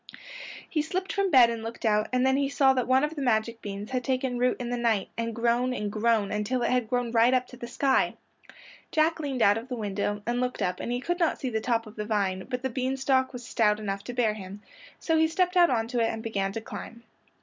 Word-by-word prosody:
He 310 Hz, -, 0 dB
slipped 370 Hz, +5 st, -3 dB
from 395 Hz, -1 st, +1 dB
bed 250 Hz, -7 st, +6 dB
and 230 Hz, -1 st, -4 dB
looked 225 Hz, +1 st, -7 dB
out, 215 Hz, -1 st, +2 dB
and 255 Hz, 0 st, +2 dB
then 265 Hz, 0 st, +3 dB
he 275 Hz, 0 st, +1 dB
saw 270 Hz, -1 st, +4 dB
that 255 Hz, -2 st, -1 dB
one 260 Hz, +2 st, +4 dB
of 300 Hz, +1 st, -1 dB
the 290 Hz, -, -4 dB
magic 230 Hz, -2 st, 0 dB
beans 205 Hz, +3 st, -6 dB
had 255 Hz, -1 st, -1 dB
taken 255 Hz, -1 st, -1 dB
root 250 Hz, 0 st, +2 dB
in 245 Hz, -1 st, -4 dB
the -, -, 0 dB
night 230 Hz, -5 st, 0 dB
and 230 Hz, -1 st, -3 dB
grown 240 Hz, +2 st, +1 dB
and 210 Hz, -3 st, -3 dB
grown 215 Hz, -2 st, +1 dB
until 210 Hz, +4 st, -1 dB
it -, -, +1 dB
had 250 Hz, -3 st, 0 dB
grown 245 Hz, -2 st, -1 dB
right 235 Hz, +2 st, +4 dB
up 255 Hz, 0 st, +1 dB
to -, -, -11 dB
the 240 Hz, -, -7 dB
sky. 265 Hz, +2 st, +1 dB, 0.8 s
Jack 320 Hz, +1 st, +2 dB
leaned 275 Hz, -5 st, -1 dB
out 205 Hz, +2 st, +4 dB
of 230 Hz, -, -11 dB
the 255 Hz, -, -4 dB
window 205 Hz, -1 st, -3 dB
and 240 Hz, +1 st, -1 dB
looked 250 Hz, -4 st, -2 dB
up 180 Hz, -1 st, -1 dB
and -, -, -4 dB
he 245 Hz, +1 st, -1 dB
could 350 Hz, +5 st, -2 dB
not 335 Hz, -, +1 dB
see 260 Hz, -3 st, -3 dB
the 220 Hz, -1 st, -1 dB
top 230 Hz, -1 st, 0 dB
of 215 Hz, 0 st, -13 dB
the 210 Hz, -, -3 dB
vine, 195 Hz, -3 st, -1 dB
but 250 Hz, 0 st, -3 dB
the 265 Hz, -, 0 dB
bean 260 Hz, +2 st, -1 dB
stalk 265 Hz, -1 st, +1 dB
was 245 Hz, -2 st, -8 dB
stout 210 Hz, -4 st, +2 dB
enough 200 Hz, -2 st, -4 dB
to -, -, -5 dB
bear 235 Hz, -3 st, +1 dB
him, 200 Hz, 0 st, -9 dB, 0.4 s
so 325 Hz, -1 st, +1 dB
he 320 Hz, -, +4 dB
stepped 360 Hz, +3 st, 0 dB
out 350 Hz, -1 st, +6 dB
onto 235 Hz, 0 st, 0 dB
it 225 Hz, -1 st, +2 dB
and 225 Hz, -, -5 dB
began 195 Hz, -4 st, -1 dB
to 225 Hz, -, -5 dB
climb. 230 Hz, +1 st, -9 dB
240 Hz, 260 wpm, -27 LUFS, 220-260 Hz, 0.8 s, bed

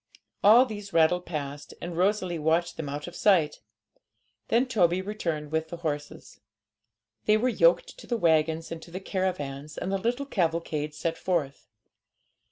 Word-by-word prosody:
All 230 Hz, +5 st, +8 dB
these 205 Hz, -5 st, -8 dB
rattled 170 Hz, +2 st, +3 dB
past, 145 Hz, -3 st, -5 dB
and 175 Hz, -1 st, -6 dB
Rosalie 185 Hz, -1 st, +1 dB
watched 165 Hz, +3 st, +1 dB
them 150 Hz, -3 st, -5 dB
out 145 Hz, +1 st, -4 dB
of 175 Hz, -, -9 dB
sight. 175 Hz, -8 st, +3 dB, 0.9 s
Then 235 Hz, +3 st, +3 dB
Toby 185 Hz, -8 st, +2 dB
returned 170 Hz, -7 st, -3 dB
with 160 Hz, 0 st, -1 dB
the 170 Hz, -, -6 dB
horses; 150 Hz, -3 st, -5 dB, 0.9 s
they 215 Hz, -, +5 dB
were 245 Hz, +4 st, +1 dB
yoked -, -, +2 dB
to -, -, -12 dB
the 240 Hz, -, 0 dB
waggons 160 Hz, -2 st, +2 dB
and 165 Hz, -1 st, -5 dB
to 170 Hz, -, -12 dB
the 180 Hz, +2 st, -6 dB
caravans, 155 Hz, -7 st, -3 dB
and 190 Hz, -, -3 dB
the 195 Hz, -, 0 dB
little 245 Hz, +7 st, -1 dB
cavalcade 165 Hz, -, -1 dB
set 165 Hz, +1 st, -3 dB
forth. 155 Hz, -7 st, -2 dB
170 Hz, 160 wpm, -27 LUFS, 155-200 Hz, 0.9 s, All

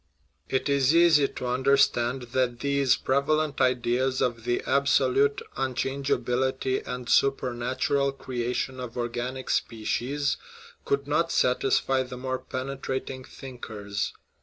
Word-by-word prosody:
It 130 Hz, -, 0 dB
is 140 Hz, +1 st, +3 dB
easy 165 Hz, -4 st, +6 dB
to 125 Hz, -, -7 dB
understand 130 Hz, -1 st, +2 dB
that 125 Hz, -2 st, 0 dB
these 140 Hz, -2 st, +3 dB
prevalent 145 Hz, +2 st, 0 dB
ideas 130 Hz, +1 st, +1 dB
of 115 Hz, -2 st, -1 dB
the 120 Hz, 0 st, 0 dB
absolute 140 Hz, 0 st, +2 dB
unchangeability 130 Hz, 0 st, -1 dB
and 125 Hz, -1 st, -5 dB
supernatural 135 Hz, +1 st, +1 dB
crea 125 Hz, -3 st, -4 dB
tion 130 Hz, +1 st, -3 dB
of 125 Hz, -1 st, -7 dB
organic 120 Hz, +2 st, -3 dB
species 125 Hz, +5 st, -1 dB, 0.5 s
could 420 Hz, -, 0 dB
not -, -, +1 dB
satisfy 400 Hz, -, +2 dB
the 125 Hz, -1 st, -6 dB
more 130 Hz, 0 st, -3 dB
pene 135 Hz, +1 st, -5 dB
trating 130 Hz, -1 st, -4 dB
thinkers. 105 Hz, -6 st, -5 dB
130 Hz, 115 wpm, -27 LUFS, 125-140 Hz, 0.5 s, easy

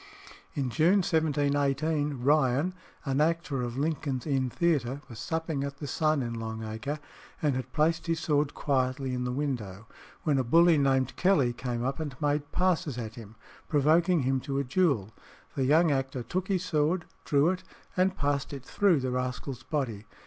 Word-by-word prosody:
In 135 Hz, -4 st, -1 dB
June 175 Hz, -, +4 dB
1718 145 Hz, -2 st, +1 dB
Ryan, 145 Hz, +4 st, +3 dB, 0.3 s
an 135 Hz, 0 st, +1 dB
actor 155 Hz, -4 st, 0 dB
of 120 Hz, 0 st, -4 dB
Lincoln's 140 Hz, -3 st, -1 dB
Inn 135 Hz, -4 st, 0 dB
Theatre, 140 Hz, -4 st, 0 dB
was 115 Hz, -2 st, -10 dB
supping 160 Hz, +1 st, -2 dB
at 140 Hz, 0 st, -5 dB
the 150 Hz, -, -6 dB
Sun 155 Hz, 0 st, +1 dB
in 120 Hz, -1 st, -3 dB
Long 110 Hz, -1 st, -5 dB
Acre, 110 Hz, +7 st, -4 dB, 0.4 s
and 145 Hz, -4 st, +1 dB
had 130 Hz, 0 st, -4 dB
placed 160 Hz, +2 st, +1 dB
his 165 Hz, -1 st, 0 dB
sword 145 Hz, -2 st, +1 dB
quietly 130 Hz, -1 st, 0 dB
in 125 Hz, 0 st, -2 dB
the 125 Hz, -, -1 dB
window, 120 Hz, -8 st, -3 dB, 0.4 s
when 145 Hz, -4 st, +2 dB
a -, -, +2 dB
bully 165 Hz, +5 st, +5 dB
named 135 Hz, -2 st, +2 dB
Kelly 150 Hz, -10 st, +3 dB
came 120 Hz, -1 st, -3 dB
up 135 Hz, +4 st, -2 dB
and 145 Hz, -5 st, -5 dB
made 145 Hz, -1 st, 0 dB
passes 175 Hz, -7 st, +1 dB
at 110 Hz, -2 st, -5 dB
him, 115 Hz, -3 st, -11 dB, 0.3 s
provoking 160 Hz, +3 st, +3 dB
him 130 Hz, +1 st, +1 dB
to 135 Hz, +1 st, -3 dB
a 140 Hz, -, +1 dB
duel. 130 Hz, -, +1 dB, 0.4 s
The 135 Hz, -, 0 dB
young 155 Hz, +4 st, +4 dB
actor 135 Hz, -2 st, -1 dB
took 185 Hz, +10 st, -3 dB
his 185 Hz, -2 st, 0 dB
sword, 160 Hz, +1 st, +1 dB, 0.2 s
drew 145 Hz, +3 st, +3 dB
it, 185 Hz, -, -5 dB, 0.3 s
and 185 Hz, +1 st, +2 dB
passed 145 Hz, 0 st, -1 dB
it 135 Hz, -2 st, -7 dB
through 185 Hz, -8 st, +3 dB
the 130 Hz, 0 st, -1 dB
rascal's 125 Hz, 0 st, -3 dB
body. 125 Hz, -7 st, -3 dB
140 Hz, 175 wpm, -29 LUFS, 125-160 Hz, 0.4 s, bully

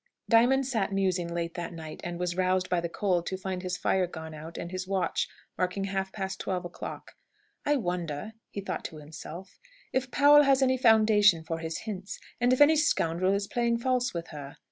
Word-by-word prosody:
Diamond 245 Hz, +4 st, +4 dB
sat 225 Hz, -7 st, -1 dB
musing 185 Hz, -3 st, 0 dB
late 170 Hz, 0 st, -3 dB
that 175 Hz, 0 st, -5 dB
night, 160 Hz, -2 st, -8 dB
and 175 Hz, 0 st, -4 dB
was 175 Hz, 0 st, -2 dB
roused 185 Hz, 0 st, +1 dB
by 175 Hz, -1 st, +2 dB
the 170 Hz, -, -3 dB
cold 175 Hz, -2 st, 0 dB
to 190 Hz, -, -2 dB
find 185 Hz, -1 st, -4 dB
his 180 Hz, 0 st, -3 dB
fire 185 Hz, -2 st, +1 dB
gone 160 Hz, -2 st, -8 dB
out 160 Hz, +2 st, -9 dB
and 170 Hz, -, -5 dB
his 185 Hz, 0 st, -4 dB
watch 190 Hz, -1 st, 0 dB, 0.3 s
marking 185 Hz, +2 st, 0 dB
half 195 Hz, -1 st, -2 dB
past 190 Hz, -2 st, -4 dB
twelve 180 Hz, -2 st, -2 dB
o'clock. 175 Hz, -, -7 dB, 0.6 s
"I 295 Hz, -, +4 dB
wonder," 175 Hz, -, -3 dB, 0.2 s
he 200 Hz, -, -5 dB
thought 195 Hz, -, -4 dB
to 160 Hz, -, -6 dB
himself, 160 Hz, +4 st, -10 dB, 0.3 s
"if 260 Hz, 0 st, 0 dB
Powell 290 Hz, +3 st, +7 dB
has 275 Hz, -1 st, +4 dB
any 260 Hz, 0 st, +3 dB
foundation 215 Hz, -7 st, +5 dB
for 165 Hz, 0 st, -4 dB
his 160 Hz, 0 st, -4 dB
hints, 195 Hz, -3 st, -6 dB, 0.2 s
and 245 Hz, +1 st, +3 dB
if 255 Hz, -, +2 dB
any 310 Hz, +2 st, +7 dB
scoundrel 185 Hz, -, +2 dB
is 200 Hz, 0 st, -1 dB
playing 235 Hz, +2 st, 0 dB
false 250 Hz, 0 st, 0 dB
with 170 Hz, -1 st, -5 dB
her. 145 Hz, -2 st, -9 dB
185 Hz, 200 wpm, -28 LUFS, 170-225 Hz, 0.6 s, Powell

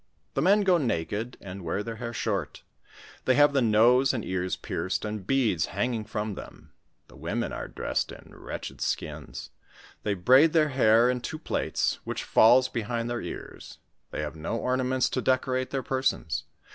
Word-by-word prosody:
The 135 Hz, -, 0 dB
men 200 Hz, +6 st, +5 dB
go 185 Hz, -3 st, +4 dB
naked, 110 Hz, -, -2 dB
and 95 Hz, -1 st, -8 dB
wear 90 Hz, +5 st, -2 dB
their 115 Hz, 0 st, -6 dB
haii* 120 Hz, 0 st, -5 dB
short; 100 Hz, -11 st, -2 dB, 0.6 s
they 130 Hz, -, +4 dB
have 145 Hz, 0 st, +5 dB
the 135 Hz, -, +3 dB
nose 120 Hz, +4 st, +4 dB
and 115 Hz, -, -3 dB
ears 90 Hz, 0 st, -1 dB
pierced, 95 Hz, -, -3 dB
and 105 Hz, -3 st, -5 dB
beads 115 Hz, -11 st, +2 dB
hanging 115 Hz, +2 st, -2 dB
from 105 Hz, -1 st, -3 dB
them. -, -, -11 dB, 0.3 s
The 65 Hz, -, -17 dB
women 85 Hz, -, -3 dB
are -, -, -5 dB
dressed -, -, -2 dB
in -, -, -13 dB
wretched -, -, -7 dB
skins; -, -, -4 dB, 0.5 s
they 105 Hz, -1 st, -1 dB
braid 130 Hz, -, +5 dB
their 155 Hz, -2 st, +4 dB
hair 120 Hz, -3 st, +4 dB
in 125 Hz, -1 st, 0 dB
two 155 Hz, -, -5 dB
plaits, 155 Hz, -, -1 dB
which -, -, -4 dB
falls 125 Hz, +3 st, +5 dB
behind 115 Hz, 0 st, -3 dB
their 120 Hz, -, -2 dB
ear?; -, -, -7 dB, 0.5 s
they -, -, -4 dB
have 75 Hz, +1 st, -5 dB
no 80 Hz, +8 st, -3 dB
ornaments 130 Hz, +1 st, +1 dB
to 130 Hz, -, -1 dB
decorate 130 Hz, 0 st, +1 dB
their 135 Hz, -1 st, -2 dB
persons. 130 Hz, -, -1 dB
120 Hz, 170 wpm, -27 LUFS, 100-130 Hz, 0.6 s, men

